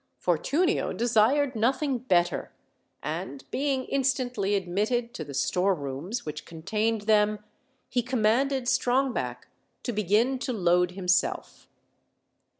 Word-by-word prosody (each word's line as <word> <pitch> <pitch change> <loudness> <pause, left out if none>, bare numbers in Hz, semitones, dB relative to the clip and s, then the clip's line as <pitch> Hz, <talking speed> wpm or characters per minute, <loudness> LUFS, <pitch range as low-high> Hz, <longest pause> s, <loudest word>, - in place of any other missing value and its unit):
Fortunio 290 - +1
desired 245 +4 +2
nothing 260 +4 +1
better; 180 -8 +1 0.5
and 275 - -5
being 270 -1 0
instantly 250 -7 0
admitted 210 +6 -1
to 160 - -5
the 145 -2 -8
storerooms 180 - -1
which 150 0 -5
contained 210 +7 -2
them, 210 0 +3 0.5
he 245 - 0
commanded 255 +3 +1
Strongback 255 +1 0 0.4
to 245 - -2
begin 215 +6 +2
to 255 -1 -2
load 180 -3 +2
himself. 180 -1 -1
220 Hz, 105 wpm, -27 LUFS, 185-260 Hz, 0.5 s, them